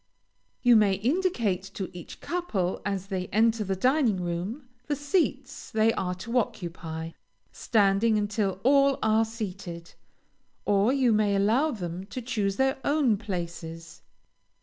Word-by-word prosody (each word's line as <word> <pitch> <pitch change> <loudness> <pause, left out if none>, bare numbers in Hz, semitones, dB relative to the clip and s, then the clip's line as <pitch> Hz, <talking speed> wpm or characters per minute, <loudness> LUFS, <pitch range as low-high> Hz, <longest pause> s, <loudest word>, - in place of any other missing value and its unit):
You 245 -1 +6
may 210 -3 +5
indicate 235 - 0
to 190 -2 -5
each 175 - -10
couple, 225 - -2
as 195 -2 -2
they 190 -2 -3
enter 220 +1 +2
the 195 -1 -2
dining 250 0 +2
room, 185 - -4 0.2
the 295 - 0
seats 290 +6 -1
they 220 +1 +3
are 180 -1 -2
to 230 +7 0
occupy, 170 -7 -5 0.4
standing 215 +1 +2
until 205 -2 -1
all 275 +1 +4
are 220 +1 +3
seated, 190 -6 -7 0.7
or 205 +3 +3
you 265 -3 +3
may 210 -1 +2
allow 225 +10 +3
them 185 - -5
to 255 - -6
choose 215 -5 -1
their 265 +2 +1
own 280 -6 +3
places. 170 -5 -6
210 Hz, 135 wpm, -27 LUFS, 185-245 Hz, 0.7 s, You